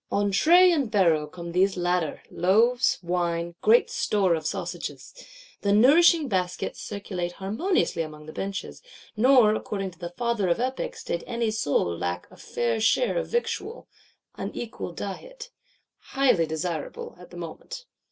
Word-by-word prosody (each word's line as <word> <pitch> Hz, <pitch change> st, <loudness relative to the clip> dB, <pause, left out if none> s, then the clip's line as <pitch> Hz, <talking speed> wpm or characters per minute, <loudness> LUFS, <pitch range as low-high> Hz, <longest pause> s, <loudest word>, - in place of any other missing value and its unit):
On 205 Hz, 0 st, +1 dB
tray 350 Hz, -, +6 dB
and 285 Hz, -8 st, 0 dB
barrow 170 Hz, -8 st, +2 dB
come 170 Hz, +2 st, -8 dB
these 190 Hz, +2 st, +2 dB
latter; 175 Hz, -3 st, -1 dB
loaves, 230 Hz, +8 st, +3 dB
wine, 170 Hz, -1 st, -1 dB
great 225 Hz, +3 st, +4 dB
store 210 Hz, -9 st, +1 dB
of 155 Hz, -2 st, -2 dB
sausages. -, -, -5 dB, 0.5 s
The 200 Hz, -, +1 dB
nourishing 305 Hz, -, +6 dB
baskets 185 Hz, -5 st, -2 dB
circulate 185 Hz, -4 st, -5 dB
harmoniously 215 Hz, -, -1 dB
along 155 Hz, -1 st, -7 dB
the 155 Hz, -, -10 dB
benches; 195 Hz, 0 st, -5 dB, 0.3 s
nor, 240 Hz, -1 st, +5 dB
according 195 Hz, -3 st, -3 dB
to 180 Hz, -, -21 dB
the 175 Hz, -1 st, -5 dB
Father 235 Hz, +1 st, -1 dB
of 170 Hz, -, +1 dB
Epics, 255 Hz, +2 st, -3 dB
did 170 Hz, -, -3 dB
any 235 Hz, -2 st, -1 dB
soul 145 Hz, -, 0 dB
lack 90 Hz, +1 st, -3 dB
a -, -, -15 dB
fair 235 Hz, -2 st, -2 dB
share -, -, +2 dB
of -, -, -4 dB
victual 475 Hz, -1 st, -3 dB
(δαῖτος -, -, -18 dB
ὲἱσης), -, -, -2 dB
an -, -, -6 dB
equal 230 Hz, -6 st, -5 dB
diet); 465 Hz, -, -8 dB, 0.5 s
highly 250 Hz, -12 st, +2 dB
desirable, 160 Hz, 0 st, -4 dB
at 180 Hz, -1 st, -13 dB
the 175 Hz, -, -12 dB
moment. 175 Hz, -, -8 dB
200 Hz, 155 wpm, -26 LUFS, 170-245 Hz, 0.5 s, tray